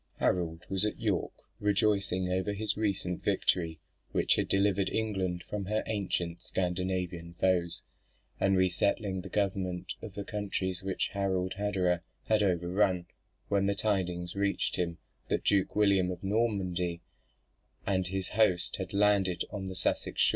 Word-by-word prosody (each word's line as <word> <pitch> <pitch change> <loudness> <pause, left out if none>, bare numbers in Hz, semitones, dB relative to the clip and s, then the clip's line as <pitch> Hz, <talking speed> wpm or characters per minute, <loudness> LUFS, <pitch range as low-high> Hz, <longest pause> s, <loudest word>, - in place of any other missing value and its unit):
Harold 85 -2 0
was 95 0 0
at 105 - -1
York, 105 -7 0 0.3
rejoicing 100 -2 +2
over 95 +2 0
his 105 +1 -1
recent 95 -4 -1
victory, 80 -3 +1 0.3
which - - +3
had - - 0
delivered 100 -1 +3
England 95 -5 -1
from 105 -2 -3
her 110 +3 0
ancient 90 -5 -2
Scandinavian 90 -2 -2
foes, 85 -1 +1 0.6
and 95 -1 +3
resettling 95 +1 +1
the 95 - -8
government 95 -2 -1
of 105 -4 -8
the 100 - -3
counties 95 -3 -2
which 95 0 -1
Harald 95 -2 0
Hardrada 95 -4 +1 0.2
had 110 -1 +2
overrun, 90 0 +2 0.4
when 100 -1 +2
the 100 - +1
tidings 90 -4 -1
reached 100 0 0
him 85 -2 -1 0.3
that - - 0
Duke 100 -2 +2
William 100 -3 +4
of 90 0 -5
Normandy 95 -5 0 0.8
and 95 -2 +1
his 95 +1 -2
host 100 -5 +2
had 95 -1 -5
landed 100 -3 +3
on 100 -2 -4
the 95 0 -5
Sussex - - -1
shore. - - +6
95 Hz, 145 wpm, -31 LUFS, 90-100 Hz, 0.8 s, shore